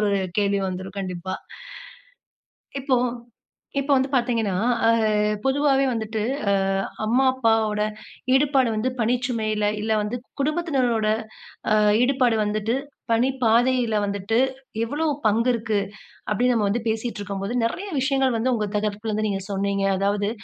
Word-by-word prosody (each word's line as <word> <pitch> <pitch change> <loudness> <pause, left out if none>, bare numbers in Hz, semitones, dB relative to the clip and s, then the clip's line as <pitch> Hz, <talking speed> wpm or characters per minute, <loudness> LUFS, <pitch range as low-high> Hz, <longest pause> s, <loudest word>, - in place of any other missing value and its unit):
ஒரு 205 - +2 0.3
கேள்வி 200 -1 +2
வந்துரும். 185 +2 -6
கண்டிப்பா. 185 0 -4 1.5
இப்போ 260 -1 +2 0.8
இப்போ 280 +1 -1
வந்து 265 +1 0
பார்த்தீங்கன்னா, 235 -6 +1 0.3
அ, - - +6 0.5
பொதுவாவே 275 0 +3
வந்துட்டு, 220 -1 -2 0.3
அ, - - +4 0.5
அம்மா, 250 +5 +3
அப்பாவோட 225 -4 +1 0.5
ஈடுபாடு 270 -3 +3
வந்து 220 +4 0
பணிச்சுமையில, 225 -3 0 0.2
இல்ல 220 0 0
வந்து, 210 +4 -3 0.2
குடும்பத்தினரோட 275 -7 +1 0.9
ஈடுபாடு 250 -2 +3
வந்துட்டு, 215 +3 -1 0.4
பணிப்பாதையில 245 -1 +2
வந்துட்டு 200 +3 -1 0.5
எவ்வளவு 295 +6 -1 0.2
பங்கு 230 +4 +2
இருக்கு, 220 -3 0 0.5
அப்படீன்னு 245 +4 +2
நம்ம 210 -3 +2
வந்து 230 +2 -1
பேசிட்டு 220 0 -3
இருக்கும்போது, 200 +3 -4
நிறைய 385 - -3
விஷயங்கள் 265 -2 +1
வந்து 250 +3 +1
உங்க 210 -3 -1
தரப்புல 210 +1 -2
இருந்து 215 +1 0
நீங்க 195 -1 -2
சொன்னீங்க. 200 0 0
அதாவது, 200 +1 0
225 Hz, 120 wpm, -23 LUFS, 210-255 Hz, 1.5 s, அ